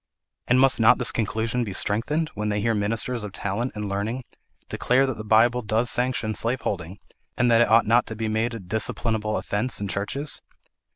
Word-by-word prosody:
And 125 +1 +4
must 135 -1 +4
not 110 - +6
this - - +1
conclusion 115 +2 -1
be 100 -4 -5
strengthened, 135 - 0
when 105 +1 -3
they 105 0 0
hear 115 +2 +1
ministers 110 +3 -2
of 105 -2 -7
talent 105 +6 -3
and 105 -1 -4
learning 105 +6 -3 0.4
declare 130 +2 +2
that 130 -2 -2
the 110 - -7
Bible 115 +3 +3
does 110 +2 0
sanction 125 -3 0
slaveholding, 100 -7 -2 0.4
and 120 0 +3
that 115 0 +5
it 120 - +3
ought 115 +1 +5
not 120 +3 +3
to 110 - -5
be 110 0 -3
made 110 +2 -1
a - - -6
disciplinable 110 +2 -1
offence 110 +5 -2
in 100 - -3
churches? 105 +10 -3
110 Hz, 190 wpm, -24 LUFS, 105-120 Hz, 0.4 s, not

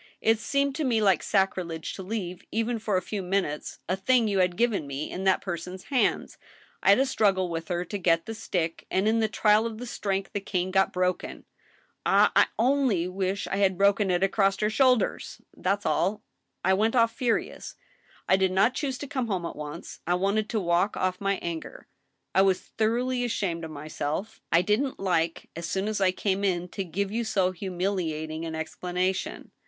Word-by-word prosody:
It 225 0 +3
seemed 280 +3 0
to 315 - -1
me 240 -5 +2
like 195 -5 +3
sacrilege 185 -5 -1
to - - -7
leave, 185 -3 -4
even 225 +1 -1
for 210 -3 0
a 185 - -1
few 205 +1 -4
min 190 +2 +1
utes, 150 -1 -6
a 185 - +1
thing 230 +4 +3
you 200 -2 +1
had 180 -1 +2
given 225 -11 +1
me, 140 +2 -4
in 190 +1 -4
that 190 -1 +3
person's 180 +1 -5
hands.... 255 - +1 0.4
I - - +3
had 200 - +8
a 270 - +3
struggle 195 -8 +2
with 165 -1 -4
her 175 -1 -2
to 205 - -4
get 165 -2 +2
the 225 - -5
stick, 175 -7 -3
and 190 +3 +1
in 225 +1 +3
the 220 - +2
trial 210 +2 +3
of 230 +2 -7
strength 195 -3 -2
the 205 - -1
cane 185 -2 -2
got 190 0 +3
broken. 180 0 -2 0.6
Ah! - - +4
I - - +6
only 240 -7 +2
wish 190 +1 -2
I 195 - -2
had 190 -2 +2
broken 200 0 +3
it 180 +1 +2
across 195 0 +2
her 210 0 +2
shoul 255 +2 +5
ders 215 - -3 0.2
I - - -18
That's 200 +2 0
all. 210 +2 +1 0.4
I 190 - +4
went 220 +5 +2
off 230 -1 +4
furious. 240 -2 -2 0.5
I 190 - +5
did 190 -1 +2
not 195 +7 +3
choose 270 -3 -2
to 285 - -6
come 260 -3 -2
home 185 -5 -2
at - - -5
once. 150 +2 -8
I 175 - +3
wanted 200 +4 0
to 225 - 0
walk 175 +2 +1
off 185 0 -1
my 195 0 +1
anger. 170 -2 -6 0.5
I 190 - +5
was 190 -1 +3
thoroughly 245 +3 -1
ashamed 190 -8 -2
of 160 - -5
myself. 155 +8 -4
I 170 +1 +5
didn't 250 +7 0
like, 170 -4 -1
as 170 +1 -4
soon 195 +2 -1
as 215 -2 -2
I 190 - +5
came 195 +1 -1
in, 180 -2 0
to 195 - -4
give 195 +3 -3
you 235 +2 -1
so 195 -5 +1
humiliating 175 -4 -3
an 160 -1 -4
explanation. 180 +4 -3
195 Hz, 205 wpm, -27 LUFS, 180-220 Hz, 0.6 s, had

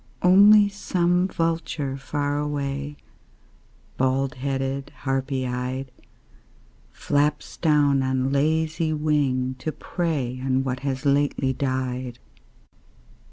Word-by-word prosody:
Only 205 +3 +7
some 180 -2 0
vulture 165 -5 -2
far 145 +1 -2
away, 145 0 -3 1.0
Bald 130 +1 +1
headed, 135 +1 -3
harpy 135 0 -1
eyed, 125 +1 -4 1.0
Flaps 145 +1 -1
down 145 -4 +3
on 130 0 0
lazy 160 +3 +1
wing 145 -4 0
to 155 - -3
prey 145 -9 -3
On 130 0 +1
what 130 -1 -2
has 135 0 -3
lately 140 -1 +1
died. 130 -2 -3
140 Hz, 95 wpm, -24 LUFS, 130-155 Hz, 1.0 s, Only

